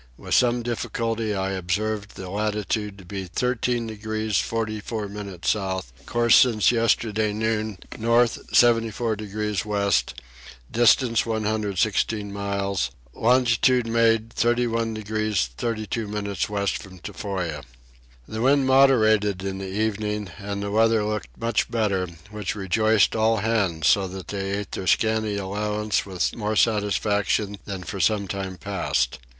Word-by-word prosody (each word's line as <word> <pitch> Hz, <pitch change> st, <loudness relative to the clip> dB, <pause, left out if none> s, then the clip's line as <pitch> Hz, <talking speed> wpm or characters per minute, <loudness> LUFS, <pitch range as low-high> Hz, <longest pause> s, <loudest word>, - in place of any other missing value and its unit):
With -, -, -5 dB
some 120 Hz, -1 st, +3 dB
difficulty 115 Hz, -2 st, -2 dB
I 95 Hz, 0 st, -1 dB
observed 100 Hz, +3 st, -2 dB
the 95 Hz, -, -7 dB
latitude 105 Hz, 0 st, -2 dB
to 95 Hz, -, -13 dB
be 95 Hz, +1 st, -5 dB
13 120 Hz, +4 st, -1 dB
degrees 110 Hz, -1 st, -2 dB
44 110 Hz, -1 st, -3 dB
minutes 100 Hz, -3 st, -3 dB
south: 95 Hz, -, -3 dB
course 120 Hz, -1 st, +4 dB
since 110 Hz, -5 st, +5 dB
yesterday 110 Hz, -2 st, +1 dB
noon 110 Hz, -1 st, -1 dB, 0.2 s
north 115 Hz, +1 st, +3 dB
74 115 Hz, -1 st, +3 dB
degrees 105 Hz, -1 st, -3 dB
west, 100 Hz, -2 st, 0 dB, 0.5 s
distance 120 Hz, 0 st, +4 dB
116 105 Hz, -1 st, 0 dB
miles; 100 Hz, -6 st, -1 dB, 0.2 s
longitude 125 Hz, +1 st, +3 dB
made 115 Hz, -1 st, +2 dB
31 115 Hz, -1 st, +1 dB
degrees 110 Hz, -, -1 dB
32 110 Hz, -, -3 dB
minutes 100 Hz, -3 st, -3 dB
west 100 Hz, -1 st, -1 dB
from 95 Hz, -1 st, -12 dB
Tofoa. 90 Hz, -5 st, -4 dB, 0.7 s
The 110 Hz, -, -4 dB
wind 135 Hz, +2 st, +4 dB
moderated 110 Hz, -8 st, +4 dB
in 95 Hz, 0 st, -3 dB
the 95 Hz, -1 st, -5 dB
evening 105 Hz, -1 st, -2 dB
and 100 Hz, 0 st, -4 dB
the 100 Hz, -, -3 dB
weather 110 Hz, 0 st, +3 dB
looked 105 Hz, 0 st, -3 dB
much 115 Hz, -1 st, 0 dB
better, 100 Hz, -5 st, 0 dB, 0.2 s
which 105 Hz, -2 st, -3 dB
rejoiced 105 Hz, +2 st, +2 dB
all 110 Hz, 0 st, +3 dB
hands 100 Hz, -7 st, 0 dB
so 100 Hz, -1 st, +3 dB
that 95 Hz, 0 st, -8 dB
they 95 Hz, -1 st, -3 dB
ate 105 Hz, -, -6 dB
their 95 Hz, -, -4 dB
scanty 110 Hz, -1 st, +2 dB
allowance 105 Hz, +2 st, -1 dB
with 95 Hz, -2 st, -1 dB
more 110 Hz, -1 st, -2 dB
satisfaction 105 Hz, -1 st, +1 dB
than 95 Hz, -3 st, -5 dB
for 95 Hz, +3 st, -6 dB
some 100 Hz, +2 st, +2 dB
time 95 Hz, -1 st, -4 dB
past. 90 Hz, -12 st, -1 dB
105 Hz, 135 wpm, -24 LUFS, 100-115 Hz, 0.7 s, since